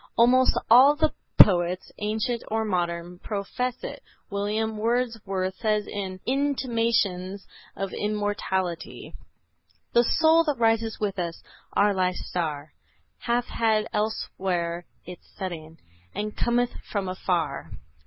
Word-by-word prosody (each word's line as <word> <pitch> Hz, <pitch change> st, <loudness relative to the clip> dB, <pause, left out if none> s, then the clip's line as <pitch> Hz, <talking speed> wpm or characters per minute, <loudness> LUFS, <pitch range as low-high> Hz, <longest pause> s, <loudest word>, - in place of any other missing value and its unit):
Almost 255 Hz, +2 st, +5 dB
all 255 Hz, +5 st, +8 dB
of -, -, -13 dB
the 315 Hz, 0 st, +2 dB, 0.3 s
poets, 180 Hz, -1 st, +5 dB
ancient 220 Hz, +3 st, -1 dB
or 220 Hz, 0 st, -1 dB
modern, 175 Hz, -2 st, -2 dB
profess 225 Hz, +5 st, -3 dB
it. -, -, -6 dB, 0.3 s
William 210 Hz, +2 st, -1 dB
Wordsworth 215 Hz, -5 st, -1 dB
says 215 Hz, -2 st, +1 dB
in 190 Hz, -2 st, -5 dB
"Intimations 230 Hz, -8 st, 0 dB, 0.3 s
of 195 Hz, -1 st, -4 dB
Immortality:" 205 Hz, -4 st, -2 dB, 0.8 s
"The 240 Hz, -, +6 dB
soul 320 Hz, +6 st, +4 dB
that 295 Hz, -4 st, 0 dB
rises 225 Hz, -1 st, +1 dB
with 200 Hz, -2 st, -2 dB
us, 170 Hz, -1 st, -4 dB, 0.3 s
our 205 Hz, 0 st, +4 dB
life's 185 Hz, -1 st, -1 dB
star, 155 Hz, -4 st, -3 dB, 0.5 s
Hath 240 Hz, 0 st, 0 dB
had 220 Hz, -2 st, +1 dB
elsewhere 180 Hz, -5 st, -2 dB, 0.2 s
its 180 Hz, 0 st, -11 dB
setting, 165 Hz, -4 st, -6 dB, 0.4 s
And 210 Hz, 0 st, -3 dB
cometh 240 Hz, 0 st, +1 dB, 0.2 s
from 200 Hz, -3 st, -1 dB
afar." 185 Hz, -2 st, -2 dB
210 Hz, 115 wpm, -26 LUFS, 185-235 Hz, 0.8 s, all